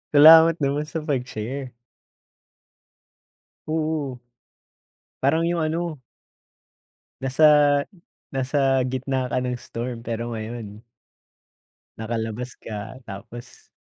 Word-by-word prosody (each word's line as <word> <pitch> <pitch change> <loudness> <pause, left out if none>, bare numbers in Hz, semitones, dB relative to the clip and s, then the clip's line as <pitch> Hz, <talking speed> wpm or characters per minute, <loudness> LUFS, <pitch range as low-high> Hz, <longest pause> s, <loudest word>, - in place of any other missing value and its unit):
Salamat 160 +2 +9
naman 145 +2 0
sa 160 0 -4
pag-share. 130 -2 -4 1.9
Oo. 155 -4 -2 1.0
Parang 160 +5 +3
yung 170 -1 0
ano. 160 -1 -2 1.2
Nasa 135 +4 +2 0.9
nasa 135 0 +1
gitna 130 0 -2
ka 130 - +1
ng 125 -1 -2
storm, 120 0 -6
pero 115 0 -3
ngayon 110 -1 -7 1.1
nakalabas 115 +2 -4
ka, 105 +4 -7
tapos 115 +5 -11
130 Hz, 80 wpm, -24 LUFS, 115-150 Hz, 1.9 s, Salamat